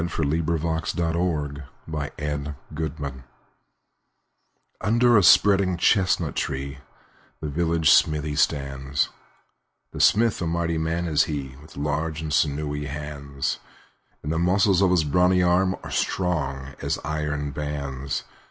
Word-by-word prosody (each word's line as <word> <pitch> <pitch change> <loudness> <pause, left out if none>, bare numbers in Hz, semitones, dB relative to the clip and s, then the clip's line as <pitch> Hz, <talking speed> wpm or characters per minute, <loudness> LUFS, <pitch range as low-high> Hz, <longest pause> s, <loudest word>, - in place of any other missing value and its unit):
The 85 - -2
Village 80 0 -1 0.2
Blacksmith 75 -2 -5 1.6
UNDER 120 +2 +4
a - - +6
spreading 95 -1 +5
chestnut 90 -5 +2
tree 70 0 -3 0.6
The 75 - -4
village 80 +1 +2
smithy 75 -1 +3
stands; 70 -2 0 0.8
The - - -4
smith, 115 -2 +4
a 85 - -1
mighty 85 -1 -1
man 80 +2 -1
is 75 -3 +3
he, 70 -4 -5
With 75 0 -15
large 75 +2 -2
and 75 -1 -3
sinewy 75 0 0
hands; 70 -1 -4 0.6
And 75 - -3
the 80 - 0
muscles 95 +2 +3
of 95 - +4
his 90 -3 +3
brawny 90 +4 +3
arm 90 +2 +3
Are - - -7
strong 70 -7 -1
as - - -1
iron 75 -1 -2
bands. 70 -2 -4
75 Hz, 115 wpm, -24 LUFS, 70-85 Hz, 1.6 s, a